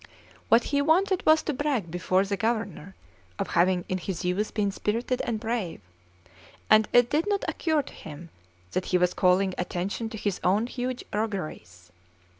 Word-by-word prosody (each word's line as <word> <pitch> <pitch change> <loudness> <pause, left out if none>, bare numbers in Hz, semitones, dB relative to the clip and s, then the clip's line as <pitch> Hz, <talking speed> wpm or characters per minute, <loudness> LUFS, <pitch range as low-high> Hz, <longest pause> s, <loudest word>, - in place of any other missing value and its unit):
What 230 +1 +6
he 285 -1 0
wanted 365 +5 +2
was 315 0 +6
to 300 - -1
brag 260 - -1
before 185 +2 +1
the 200 0 -1
Governor 205 -4 -2 0.4
of - - -3
having 180 +1 +2
in 185 - -2
his 180 0 -4
youth 195 +4 0
been 205 -2 0
spirited 230 +5 -1
and 225 -2 -2
brave; 220 -6 -3 0.9
and 215 -1 +6
it 245 0 +5
did 315 +6 +1
not 405 -1 0
occur 315 -4 0
to - - -12
him 160 +2 -10 0.4
that 185 - -1
he 180 - +2
was 180 0 +2
calling 185 +1 +3
attention 185 +5 -3
to 220 - -7
his 205 -3 -2
own 205 +5 +3
huge 250 0 -4
rogueries. 155 - -4
210 Hz, 170 wpm, -27 LUFS, 180-245 Hz, 0.9 s, What